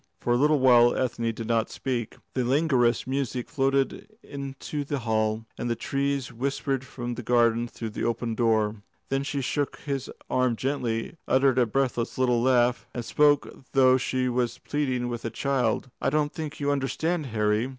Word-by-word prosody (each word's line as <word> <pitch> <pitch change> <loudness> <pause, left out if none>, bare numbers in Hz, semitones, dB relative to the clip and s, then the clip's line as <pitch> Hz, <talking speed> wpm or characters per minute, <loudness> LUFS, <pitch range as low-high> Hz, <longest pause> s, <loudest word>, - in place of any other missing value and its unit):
For 120 - +1
a - - +4
little 150 +4 +4
while 120 -2 +6
Ethne 115 -2 0
did 115 0 -6
not 115 -1 +1
speak. 120 -4 -3 0.2
The 130 - 0
languorous 125 -3 +2
music 130 -2 -2
floated 135 +1 0
into 140 +1 -5
the 145 0 -2
hall, 110 -2 0
and 120 - -2
the 115 - +1
trees 140 -1 -2
whispered 135 +1 -2
from 120 -1 -5
the 120 - -5
garden 120 0 +2
through 115 -2 -6
the - - -4
open 115 0 -1
door. 110 -2 +1 0.3
Then 135 0 +1
she 140 0 -2
shook 145 +2 -1
his 140 -3 -3 0.2
arm 130 -2 +1
gently, 125 +1 -2
uttered 130 -1 +3
a 120 - +3
breathless 120 0 -1
little 125 -2 +2
laugh, 125 -1 +2
and 120 -2 -3
spoke 145 +1 +4
as 135 - -14
though 130 -1 +6
she 130 0 -1
were 125 0 +1 0.2
pleading 130 -4 -1
with 120 -1 -4
a 115 - -2
child. 125 0 0
"I - - +2
don't 150 +1 0
think 155 -2 -6
you 145 0 +1
understand, 150 +3 -1
Harry. 105 +1 +1
125 Hz, 180 wpm, -26 LUFS, 120-140 Hz, 0.3 s, while